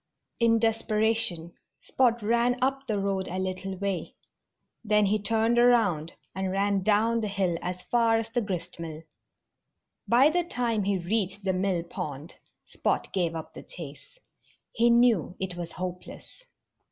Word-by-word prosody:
In 230 -1 +4
desperation 220 -6 0 0.3
Spot 240 -3 +1
ran 235 +3 +2
up 270 +1 -1
the 215 -3 0
road 195 -1 -1
a 185 - -4
little 190 0 -3
way. 195 -3 -3 0.7
Then 210 -1 +3
he 210 +2 +1
turned 225 +3 +1
around 205 -10 +3 0.2
and 190 0 -2
ran 200 0 +1
down 220 +3 +2
the 215 - -1
hill 195 -3 0
as 180 0 -5
far 230 -2 +2
as 225 0 -2
the 240 - 0
gristmill. 170 -5 -5 1.0
By 260 +6 +5
the 350 +2 +1
time 235 - -1
he 200 -1 +1
reached 195 +2 -1
the 190 -1 +1
mill 185 -2 0
pond 150 -2 -6 0.3
Spot - - -2
gave 170 -3 0
up 160 - -7
the - - -9
chase. 165 - -11 0.5
He 235 +1 +3
knew 235 -7 +3
it 185 -2 -3
was 175 -1 -6
hopeless. 180 - -8
200 Hz, 150 wpm, -27 LUFS, 180-230 Hz, 1.0 s, By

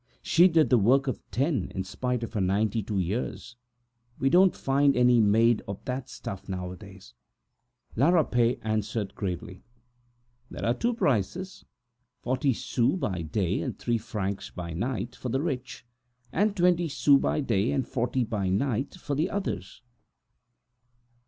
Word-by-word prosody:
She 175 +2 +5
used 160 -5 +3
to 125 - +6
work 130 +7 +4
for 130 - 0 0.2
ten, 140 +2 -1
in 95 - -1
spite 125 +5 -3
of 115 - -6
her 105 - -1
ninety 105 +4 +1
two 105 0 -3
years. 105 +5 -3 0.6
You 135 0 +2
don't 185 0 +5
find 140 0 +2
any 125 -1 +5
made 110 +2 +4
of 100 0 -7
that 130 0 -4
stuff 95 +1 -7
nowadays!" 95 - -7 0.8
La 140 +8 +4
Rapet 125 -8 +3
answered 110 -1 -2
gravely: 95 -1 -5 0.9
"There - - -5
are 115 - +3
two 235 - -1
prices. 170 - -1 0.6
Forty 130 +2 +1
sous 125 +5 0
by 105 - -2
day 85 +3 -1
and - - -4
three 120 -1 -1
francs 100 -3 -4
by 85 -2 -6
night 120 +6 -3
for 125 - -5
the 130 - 0
rich, 130 -6 -4 0.5
and 205 +1 +1
twenty 175 -1 +3
sous 140 0 +4
by - - 0
day, 115 -6 +1
and 135 -4 -1
forty 125 0 0
by 105 -5 -2
night 125 - -1
for 160 -5 -5
the 150 +4 0
others. 110 - -4
120 Hz, 150 wpm, -27 LUFS, 100-140 Hz, 0.9 s, to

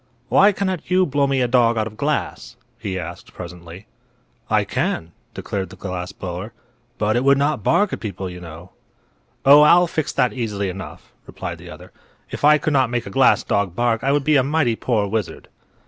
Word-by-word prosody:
"Why 195 - +5
cannot 190 -4 -3
you 185 0 +3
blow 140 -1 +1
me 135 -1 0
a 125 - +2
dog 120 -2 +3
out 110 - +1
of 110 -1 -8
glass?" 145 +6 -3 0.2
he 100 -5 -4
asked, 85 0 -8
presently. 90 +2 -10 0.6
"I - - +3
can," 80 +1 -2 0.2
declared 95 -2 -4
the 95 - -12
glass 90 -1 -5
blower; 95 +4 -7 0.4
"but 105 +1 0
it 120 - +1
would 140 0 +5
not 145 -2 0
bark 205 - +2
at - - -3
people, 95 -3 -5
you 90 -1 -9
know." 85 +1 -11 0.7
"Oh, 145 +2 +8
I'll 175 +4 +6
fix 160 -3 -2
that 125 - +1
easily 105 -6 -3
enough," 95 +1 -9
replied - - -7
the - - -12
other. - - -12 0.4
"If - - -7
I 150 +1 +6
could 150 +1 -2
not 130 -3 +3
make 120 -1 -2
a 100 - -8
glass - - +4
dog 100 -4 -1
bark 120 -2 0
I 135 - +2
would 145 0 +1
be 150 +1 +3
a 130 - +3
mighty 140 -4 +1
poor 110 -3 0
wizard." 105 -2 -4
115 Hz, 200 wpm, -21 LUFS, 95-140 Hz, 0.7 s, Oh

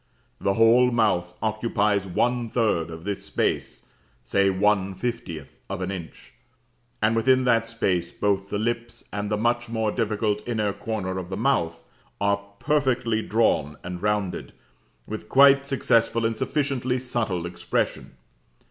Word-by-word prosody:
The 100 0 +1
whole 115 +3 +6
mouth 100 -7 +1
occupies 105 -2 +1
one 120 +5 0
third 105 -9 +1
of 80 0 -8
this 100 +1 -3
space, - - -2 0.4
say 100 +10 +2
one 95 0 +1
fiftieth 95 -7 -5
of - - -3
an 95 +1 -3
inch, 90 -4 -9 0.7
and 110 +1 +3
within 130 +3 +3
that 115 -2 +2
space 90 -7 0
both 100 0 0
the 105 - -1
lips 120 +2 -3
and 105 0 -2
the 105 - 0
much 120 +1 0
more 110 -2 0
difficult 105 -2 0
inner 105 -4 0
corner 95 -5 -3
of 90 -1 -7
the 95 - -4
mouth 95 -9 0 0.3
are 100 0 +2 0.2
perfectly 125 -4 +1
drawn 80 -11 +1
and 90 0 -6
rounded, 105 -3 -1 0.5
with 110 - -7
quite 140 0 +6
successful 115 -4 +2
and 115 0 0
sufficiently 130 -1 -1
subtle 115 -9 -2
expression. 85 0 -2
110 Hz, 140 wpm, -25 LUFS, 95-120 Hz, 0.7 s, whole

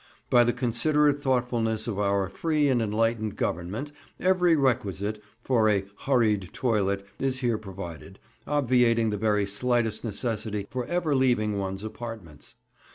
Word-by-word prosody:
By 120 - +7
the 120 - +2
considerate 145 +5 +1
thoughtfulness 120 -5 0
of 105 -3 -3
our 100 -1 +1
free 150 - 0
and 125 -3 +2
enlightened 110 0 0
Government 100 - -3 0.3
every 180 -2 +3
requisite 105 -6 0 0.2
for 115 -4 +3
a 100 -2 +1
(hurried) 110 -9 +1
toilet 100 -5 0
is 130 0 -1
here 120 -3 +1
provided, 95 -2 -9 0.3
obviating 125 -5 +2
the 105 - -2
very 105 -1 +1
slightest 115 +2 0
necessity 105 -2 -3
for 125 -1 -3
ever 175 -4 0
leaving 110 -6 +2
one's 95 +1 -4
apartments. 110 -8 -8
115 Hz, 135 wpm, -27 LUFS, 100-130 Hz, 0.3 s, By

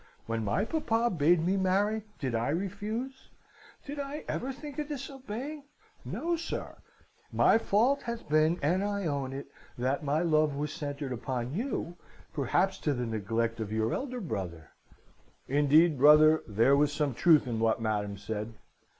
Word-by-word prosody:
When 115 0 -2
my 165 - 0
papa 235 -6 0
bade 165 0 +3
me 190 +2 +2
marry, 200 +3 +1 0.2
did 130 -4 -3
I 115 +3 0
refuse? 210 - -4 0.6
Did 290 +1 -6
I 285 +2 -5
ever 260 +3 -2
think 285 +2 -8
of 300 - -2
disobeying? 275 0 -6 0.4
No, 340 +1 -2
sir. 335 0 -5 0.5
My 225 - +4
fault 235 +7 +2
hath 235 -1 -6
been, 155 +3 +3
and 180 +7 +2
I 200 -1 -2
own 140 -4 -2
it, 135 +1 -7 0.3
that 130 +5 -1
my 150 +3 +1
love 155 -3 +2
was 150 +1 -3
centred 145 -2 -5
upon 125 +1 -3
you, 185 - -3 0.4
perhaps 180 +7 +1
to 145 -3 0
the 125 0 -2
neglect 115 +1 -2
of 110 -2 -4
your 110 +1 0
elder 255 -2 -3
brother.' 90 - -5 0.8
(Indeed, 145 +2 +4
brother, 155 +2 +7
there 115 +6 +4
was 145 +1 +3
some 145 -2 -1
truth 160 +3 +5
in 115 -3 -3
what 115 +1 +2
Madam 105 -2 -2
said.) 110 +2 -5
155 Hz, 160 wpm, -30 LUFS, -, 0.8 s, brother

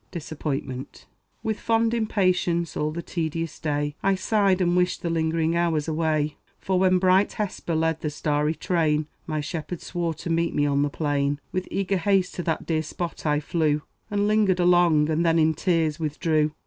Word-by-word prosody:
DISAPPOINTMENT. 145 -5 -5 0.4
With 220 -2 -2
fond 225 0 +1
impatience, 185 -6 +1
all 150 - 0
the 170 +2 -5
tedious 165 -1 -3
day 145 -1 -1
I 195 0 +2
sighed, 195 -1 +2
and 175 -1 +2
wished 180 0 +1
the 170 - -1
lingering 165 0 +1
hours 165 -3 +1
away; 155 -2 0 0.2
For 190 -1 0
when 185 0 +4
bright 185 +2 +3
Hesper 185 -5 -3
led 160 0 0
the 150 - -1
starry 150 +1 0
train, 155 -4 +1 0.2
My 155 -2 -1
shepherd 165 +3 -5
swore 170 -2 -3
to 170 - -5
meet 165 0 0
me 145 - +2
on 140 -1 +2
the 145 - +1
plain. 145 -1 -1
With 185 0 -2
eager 195 0 0
haste 190 0 +1
to - - -4
that 160 - -1
dear 160 -2 0
spot 165 +1 -5
I 150 0 +2
flew, 150 -1 0 0.3
And 205 0 +1
lingered 210 -4 +3
long, 175 -4 +4
and 160 +1 +1
then 165 -1 +3
in 160 0 +4
tears 165 -2 0
withdrew. 155 0 0
165 Hz, 180 wpm, -25 LUFS, 155-180 Hz, 0.4 s, when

